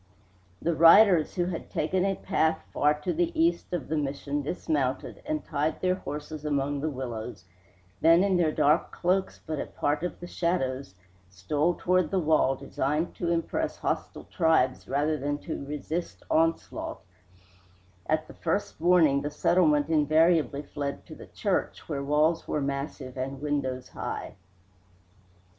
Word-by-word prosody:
The 170 Hz, -, +1 dB
riders, 170 Hz, +1 st, +6 dB
who 175 Hz, -, +1 dB
had 175 Hz, -2 st, -5 dB
taken 180 Hz, +4 st, 0 dB
a 195 Hz, 0 st, +1 dB
path 160 Hz, -5 st, 0 dB
far 150 Hz, +1 st, +3 dB
to 175 Hz, +3 st, -1 dB
the 170 Hz, +1 st, +1 dB
east 170 Hz, +1 st, +1 dB
of 175 Hz, -6 st, -3 dB
the 160 Hz, -, -1 dB
Mission 145 Hz, 0 st, -2 dB
dismounted 145 Hz, -3 st, -2 dB
and 310 Hz, 0 st, -2 dB
tied 150 Hz, +2 st, -1 dB
their 185 Hz, 0 st, +2 dB
horses 150 Hz, -3 st, -6 dB
among 145 Hz, -1 st, -1 dB
the 155 Hz, -, 0 dB
willows, 120 Hz, -7 st, -6 dB, 0.6 s
then, 165 Hz, +3 st, +6 dB
in 195 Hz, -2 st, +2 dB
their 170 Hz, -3 st, +2 dB
dark 150 Hz, +1 st, +2 dB
cloaks 185 Hz, +2 st, 0 dB
but 155 Hz, -2 st, -3 dB
a -, -, -3 dB
part 145 Hz, +1 st, -1 dB
of 180 Hz, -, -4 dB
the 175 Hz, -, -7 dB
shadows, 135 Hz, -, -2 dB, 0.3 s
stole 145 Hz, -, 0 dB
toward 180 Hz, -2 st, +1 dB
the 190 Hz, -, 0 dB
wall 155 Hz, -5 st, +3 dB
designed 150 Hz, +5 st, -2 dB
to 170 Hz, -, -1 dB
impress 170 Hz, -1 st, -1 dB
hostile -, -, -3 dB
tribes 160 Hz, -7 st, +1 dB
rather 150 Hz, +3 st, 0 dB
than 145 Hz, +2 st, -1 dB
to 155 Hz, -1 st, -6 dB
resist 150 Hz, +4 st, -4 dB
onslaught; 165 Hz, +1 st, 0 dB, 1.0 s
at 155 Hz, 0 st, 0 dB
the -, -, -11 dB
first 170 Hz, -1 st, -2 dB
warning 165 Hz, -5 st, +4 dB
the 145 Hz, -, -2 dB
settlement 150 Hz, -1 st, +3 dB
invariably 155 Hz, -2 st, +3 dB
fled 140 Hz, -1 st, -5 dB
to -, -, -11 dB
the -, -, -12 dB
church, -, -, -2 dB
where 140 Hz, -3 st, -3 dB
walls 150 Hz, +3 st, +2 dB
were -, -, -1 dB
massive 140 Hz, -1 st, -4 dB
and 135 Hz, +1 st, -4 dB
windows 135 Hz, -3 st, -2 dB
high. -, -, -5 dB
155 Hz, 150 wpm, -27 LUFS, 140-170 Hz, 1.0 s, riders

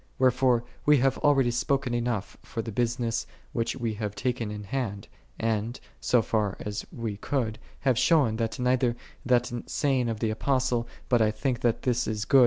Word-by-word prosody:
Wherefore 125 Hz, -1 st, +3 dB, 0.2 s
we 150 Hz, 0 st, +6 dB
have 135 Hz, +1 st, +2 dB
already 135 Hz, -4 st, +4 dB
spoken 135 Hz, +1 st, 0 dB
enough 120 Hz, -4 st, -1 dB
for 115 Hz, -, -5 dB
the 115 Hz, -, -5 dB
business 120 Hz, +1 st, 0 dB, 0.3 s
which 115 Hz, -4 st, -1 dB
we 115 Hz, -3 st, -2 dB
have 105 Hz, -1 st, -2 dB
taken 120 Hz, 0 st, -1 dB
in 105 Hz, 0 st, -5 dB
hand, 105 Hz, -2 st, -3 dB, 0.3 s
and, 115 Hz, +1 st, -1 dB, 0.2 s
so 120 Hz, -2 st, +3 dB
far 105 Hz, -3 st, 0 dB
as 105 Hz, 0 st, -4 dB
we 115 Hz, -3 st, -3 dB
I -, -, -9 dB
could, 115 Hz, -2 st, -1 dB, 0.2 s
have 130 Hz, -4 st, +2 dB
shown, 125 Hz, -5 st, +4 dB
that 115 Hz, -1 st, -1 dB
neither 125 Hz, -1 st, +2 dB, 0.3 s
that 125 Hz, 0 st, +3 dB, 0.2 s
saying 135 Hz, -4 st, +1 dB
j -, -, 0 dB
of 110 Hz, -, -4 dB
the 110 Hz, -1 st, 0 dB
Apostle, 125 Hz, 0 st, +1 dB
" -, -, -25 dB
But 120 Hz, -3 st, +3 dB
I 110 Hz, -, +4 dB
think 120 Hz, +3 st, -1 dB
that 120 Hz, -2 st, +1 dB
this 125 Hz, -1 st, +1 dB
is 110 Hz, -1 st, -2 dB
good 135 Hz, -, +6 dB
120 Hz, 195 wpm, -27 LUFS, 110-130 Hz, 0.3 s, we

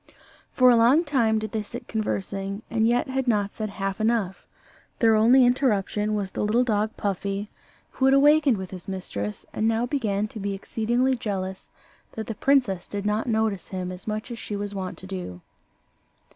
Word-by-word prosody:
For 255 Hz, -1 st, +5 dB
a -, -, +6 dB
long 245 Hz, +8 st, +5 dB
time 240 Hz, -8 st, +2 dB
did 215 Hz, 0 st, -3 dB
they 220 Hz, -, -1 dB
sit 235 Hz, +3 st, -9 dB
conversing, 200 Hz, -1 st, -3 dB
and 225 Hz, -1 st, +2 dB
yet 240 Hz, +1 st, +2 dB
had 265 Hz, 0 st, -2 dB
not 205 Hz, -3 st, +1 dB
said 215 Hz, -1 st, -3 dB
half 195 Hz, +1 st, -3 dB
enough. 215 Hz, -4 st, 0 dB, 0.5 s
Their 225 Hz, -1 st, +4 dB
only 240 Hz, +4 st, +6 dB
interruption 215 Hz, -4 st, +1 dB
was 200 Hz, -2 st, -2 dB
the -, -, -2 dB
little 225 Hz, +4 st, +3 dB
dog 215 Hz, -2 st, -1 dB
Puffy, 200 Hz, +1 st, -3 dB, 0.4 s
who 265 Hz, -, 0 dB
had 270 Hz, -, +5 dB
awakened 290 Hz, -3 st, +5 dB
with 190 Hz, -1 st, -6 dB
his 185 Hz, -2 st, -9 dB
mistress, 105 Hz, -, -5 dB
and 220 Hz, -, 0 dB
now 225 Hz, +1 st, +1 dB
began 215 Hz, -6 st, -1 dB
to 220 Hz, -, -8 dB
be 200 Hz, 0 st, -2 dB
exceedingly 240 Hz, +6 st, 0 dB
jealous 190 Hz, -5 st, -4 dB, 0.4 s
that 220 Hz, -, -5 dB
the 225 Hz, -, -4 dB
princess 235 Hz, -7 st, +1 dB
did 205 Hz, 0 st, -5 dB
not 210 Hz, +3 st, 0 dB
notice 220 Hz, -5 st, 0 dB
him 185 Hz, -1 st, -4 dB
as 180 Hz, +2 st, -9 dB
much 215 Hz, +3 st, -3 dB
as 235 Hz, -, -6 dB
she 210 Hz, -, -5 dB
was 205 Hz, 0 st, -4 dB
wont 190 Hz, -2 st, -5 dB
to -, -, -10 dB
do. 180 Hz, -, -6 dB
215 Hz, 185 wpm, -25 LUFS, 195-235 Hz, 0.5 s, a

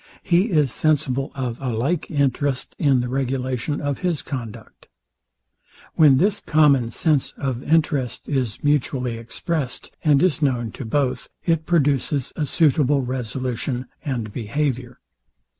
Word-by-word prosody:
He 180 Hz, +6 st, +3 dB
is 150 Hz, -, +2 dB
sensible 135 Hz, -3 st, 0 dB
of 125 Hz, -3 st, -4 dB
a 130 Hz, -, -2 dB
like 140 Hz, +9 st, -1 dB
interest 140 Hz, -2 st, 0 dB
in 135 Hz, -5 st, +3 dB
the 125 Hz, -, -2 dB
regulation 130 Hz, +1 st, -2 dB
of 145 Hz, -1 st, -2 dB
his 175 Hz, -5 st, -1 dB
conduct. 120 Hz, -6 st, -8 dB, 1.1 s
When 145 Hz, -4 st, +6 dB
this 200 Hz, +7 st, +2 dB
common 140 Hz, -6 st, +3 dB
sense 150 Hz, +3 st, 0 dB
of 130 Hz, -3 st, -2 dB
interest 150 Hz, -5 st, 0 dB
is 130 Hz, -7 st, -2 dB
mutually 130 Hz, -5 st, 0 dB
expressed, 130 Hz, +4 st, -4 dB
and 145 Hz, -1 st, +4 dB
is 165 Hz, -3 st, +2 dB
known 125 Hz, -6 st, 0 dB
to 130 Hz, -, -7 dB
both, 130 Hz, +3 st, -1 dB, 0.2 s
it 165 Hz, -2 st, +1 dB
produces 145 Hz, -4 st, +1 dB
a 150 Hz, -3 st, -1 dB
suitable 145 Hz, -2 st, +3 dB
resolution 125 Hz, 0 st, -3 dB, 0.2 s
and 120 Hz, -7 st, -3 dB
behaviour. 125 Hz, +1 st, -2 dB
135 Hz, 130 wpm, -22 LUFS, 125-150 Hz, 1.1 s, When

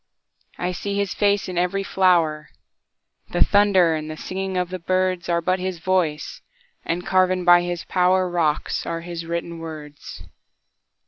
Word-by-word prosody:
I 180 Hz, +1 st, -2 dB
see 200 Hz, +3 st, -4 dB
his 200 Hz, -2 st, -1 dB
face 205 Hz, -1 st, +1 dB
in 180 Hz, -1 st, -2 dB
every 180 Hz, +2 st, 0 dB
flower; 170 Hz, -6 st, +2 dB, 0.8 s
The -, -, +5 dB
thunder 200 Hz, -5 st, +4 dB
and 155 Hz, 0 st, -4 dB
the 155 Hz, -, -6 dB
singing 190 Hz, +1 st, -4 dB
of 180 Hz, -1 st, -1 dB
the 185 Hz, 0 st, -5 dB
birdsAre 180 Hz, -1 st, 0 dB
but 185 Hz, 0 st, +1 dB
his 185 Hz, -1 st, -3 dB
voice—and 185 Hz, -, -3 dB
carven 185 Hz, -1 st, +2 dB
by 175 Hz, 0 st, +7 dB
his 175 Hz, -2 st, -4 dB
powerRocks 180 Hz, -4 st, +1 dB
are 165 Hz, 0 st, -3 dB
his 170 Hz, -1 st, -7 dB
written 170 Hz, 0 st, -4 dB
words. 155 Hz, -3 st, -9 dB
180 Hz, 140 wpm, -22 LUFS, 170-185 Hz, 0.8 s, by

